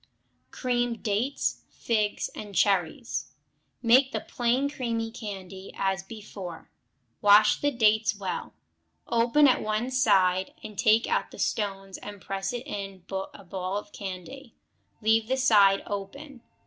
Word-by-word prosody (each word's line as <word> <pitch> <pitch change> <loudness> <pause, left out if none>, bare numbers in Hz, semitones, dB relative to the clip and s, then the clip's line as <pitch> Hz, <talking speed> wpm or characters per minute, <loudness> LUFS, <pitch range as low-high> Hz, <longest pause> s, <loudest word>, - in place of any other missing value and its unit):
Creamed 245 - -1
Dates, 225 +7 -1
Figs, 215 -3 -1
and 205 -2 -9
Cherries 195 +4 0 0.5
Make 255 +3 +5
the - - -1
plain 250 +3 0
cream 230 -5 -3
candy, 195 -4 -8
as 195 0 0
before; 195 -4 -9 0.5
wash 205 +1 +6
the 290 - +3
dates 220 -4 +2
well, 195 -2 -5 0.5
open 235 +5 +4
at 255 - +3
one 215 +4 -1
side, 190 -7 +3
and 215 - -8
take 220 +1 +4
out 480 +1 0
the - - -13
stones 195 -2 -2
and 205 -1 -9
press 195 +1 -3
in 245 0 -4 0.3
a 185 - -22 0.4
ball 185 +1 -3
of 205 0 -7
the - - -12
candy; 205 +7 -8 0.5
leave 220 0 +3
the 260 +2 0
side 205 -6 +5
open. 240 +7 -7
215 Hz, 135 wpm, -27 LUFS, 195-240 Hz, 0.5 s, wash